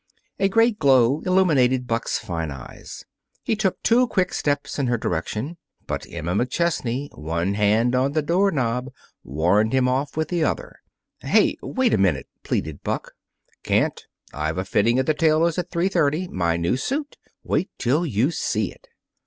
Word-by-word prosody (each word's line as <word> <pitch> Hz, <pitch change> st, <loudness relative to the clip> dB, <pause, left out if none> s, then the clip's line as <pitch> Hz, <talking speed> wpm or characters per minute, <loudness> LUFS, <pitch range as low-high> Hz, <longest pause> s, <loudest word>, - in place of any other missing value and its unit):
A 195 Hz, 0 st, +3 dB
great 225 Hz, +1 st, +3 dB
glow 135 Hz, 0 st, +4 dB
illumined 135 Hz, -9 st, +3 dB
Buck's 115 Hz, -1 st, -1 dB
fine 80 Hz, -3 st, -4 dB
eyes. 70 Hz, -3 st, -10 dB, 0.4 s
He 225 Hz, -, 0 dB
took 205 Hz, -3 st, -1 dB
two 245 Hz, +2 st, +4 dB
quick 185 Hz, -5 st, 0 dB
steps 145 Hz, 0 st, -1 dB
in 135 Hz, -, +1 dB
her 120 Hz, 0 st, +1 dB
direction. 110 Hz, -, -3 dB, 0.3 s
But -, -, -4 dB
Emma 85 Hz, +1 st, -3 dB
McChesney, 130 Hz, -, -1 dB
one 85 Hz, +5 st, -2 dB
hand 110 Hz, +4 st, +2 dB
on 130 Hz, +2 st, +1 dB
the 155 Hz, -1 st, +1 dB
door 180 Hz, +6 st, +2 dB
knob, 125 Hz, -4 st, -1 dB, 0.3 s
warned 90 Hz, -, +1 dB
him 130 Hz, -1 st, +3 dB
off 135 Hz, +4 st, -1 dB
with 160 Hz, -, -1 dB
the 175 Hz, -3 st, 0 dB
other. -, -, -2 dB, 0.4 s
"Hey -, -, +3 dB
wait 260 Hz, -3 st, 0 dB
a -, -, +3 dB
minute!" 90 Hz, -9 st, +2 dB, 0.2 s
pleaded 75 Hz, -2 st, -3 dB
Buck. -, -, -3 dB, 0.5 s
"Can't. -, -, 0 dB, 0.3 s
I've 80 Hz, +3 st, -2 dB
a 95 Hz, -, -2 dB
fitting 115 Hz, +5 st, +2 dB
at 130 Hz, -, +1 dB
the 155 Hz, -, +2 dB
tailor's 160 Hz, +2 st, +2 dB
at 180 Hz, 0 st, -4 dB
three 170 Hz, +2 st, 0 dB
thirty 170 Hz, -1 st, +1 dB
my 85 Hz, -, 0 dB
new 85 Hz, +8 st, 0 dB
suit. 285 Hz, -, -3 dB, 0.3 s
Wait 190 Hz, -, 0 dB
till 135 Hz, +7 st, +1 dB
you 135 Hz, -, +1 dB
see 110 Hz, -, -1 dB
it!" -, -, -20 dB
130 Hz, 170 wpm, -23 LUFS, 105-170 Hz, 0.5 s, glow